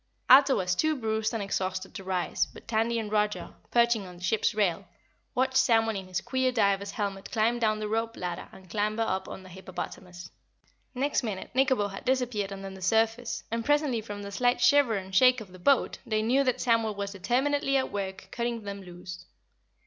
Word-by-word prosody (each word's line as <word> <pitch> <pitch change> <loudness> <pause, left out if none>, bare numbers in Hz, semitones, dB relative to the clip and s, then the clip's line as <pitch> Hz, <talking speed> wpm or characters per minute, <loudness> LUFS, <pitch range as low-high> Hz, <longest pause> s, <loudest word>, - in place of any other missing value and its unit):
Ato 270 +1 +8
was 180 -1 0
too 310 +11 +1
bruised 220 -3 -1
and 225 -3 -2
exhausted 190 -1 -3
to 195 - -7
rise, 185 -1 -1
but - - -15
Tandy 230 +1 +1
and 215 -2 -3
Roger, 210 -1 0 0.2
perching 235 -4 +2
on 180 -1 -11
the 175 - -13
ship's 210 +3 +1
rail, 190 -6 0 0.5
watched 260 +1 +2
Samuel 225 -4 +3
in 190 -1 -5
his 185 -1 -2
queer 260 -1 0
diver's 200 -4 +1
helmet 200 -1 -4
climb 230 +2 +1
down 215 -2 +2
the 215 0 -3
rope 225 +1 -2
ladder 175 -1 -5
and 190 -1 -15
clamber 215 +4 0
up 190 -3 -2
on 190 - -8
the 185 - -13
hippopotamus. 180 -1 -8 0.6
Next 280 +3 +1
minute 210 -6 -5
Nikobo 260 -5 +2
had 195 - -8
disappeared 245 -6 0
under 195 0 -6
the 190 0 -11
surface 225 +4 +1
and 230 0 -1
presently 290 -4 +2
from 205 -1 -7
the 200 - -7
slight 245 +4 +2
shiver 245 -1 +4
and 190 -1 -5
shake 255 +4 +6
of 205 -4 -10
the 185 - -13
boat 275 +8 +2
they 215 -1 0
knew 260 +5 +3
that 255 -1 +1
Samuel 230 -3 +2
was 200 0 -4
determinedly 270 +8 +1
at 260 - -1
work 190 -1 -5
cutting 235 -1 -2
them 200 -1 -6
loose. 180 0 -10
215 Hz, 195 wpm, -28 LUFS, 195-245 Hz, 0.6 s, Ato